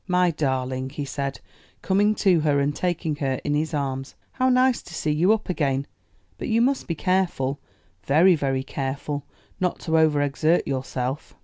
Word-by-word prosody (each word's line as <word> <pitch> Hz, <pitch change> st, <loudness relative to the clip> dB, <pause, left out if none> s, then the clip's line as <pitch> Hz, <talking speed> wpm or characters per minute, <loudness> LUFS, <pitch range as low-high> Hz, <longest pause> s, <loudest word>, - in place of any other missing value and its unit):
"My 180 Hz, -1 st, +3 dB
darling," 130 Hz, -3 st, -2 dB
he 145 Hz, +1 st, -5 dB
said, 140 Hz, 0 st, -4 dB, 0.4 s
coming 205 Hz, +2 st, +3 dB
to 185 Hz, -6 st, +3 dB
her 150 Hz, -2 st, +2 dB
and 145 Hz, +1 st, 0 dB
taking 170 Hz, -4 st, -1 dB
her 135 Hz, -3 st, -1 dB
in 145 Hz, -, -1 dB
his 155 Hz, +2 st, 0 dB
arms. 135 Hz, -3 st, -3 dB, 0.2 s
"How 260 Hz, 0 st, +1 dB
nice 255 Hz, 0 st, +3 dB
to 175 Hz, -, -11 dB
see 155 Hz, -, -1 dB
you 165 Hz, +7 st, +3 dB
up 220 Hz, -1 st, +1 dB
again; 140 Hz, -6 st, 0 dB, 0.5 s
but -, -, -4 dB
you 225 Hz, 0 st, +2 dB
must 265 Hz, +3 st, +1 dB
be 165 Hz, -, -2 dB
careful, 170 Hz, -7 st, 0 dB, 0.5 s
very, 165 Hz, +7 st, +5 dB
very 135 Hz, -4 st, 0 dB
careful, 140 Hz, +1 st, -4 dB, 0.3 s
not 180 Hz, -1 st, 0 dB
to 160 Hz, -, -5 dB
overexert 155 Hz, +1 st, +2 dB
yourself." 130 Hz, +1 st, -3 dB
150 Hz, 170 wpm, -24 LUFS, 135-180 Hz, 0.5 s, very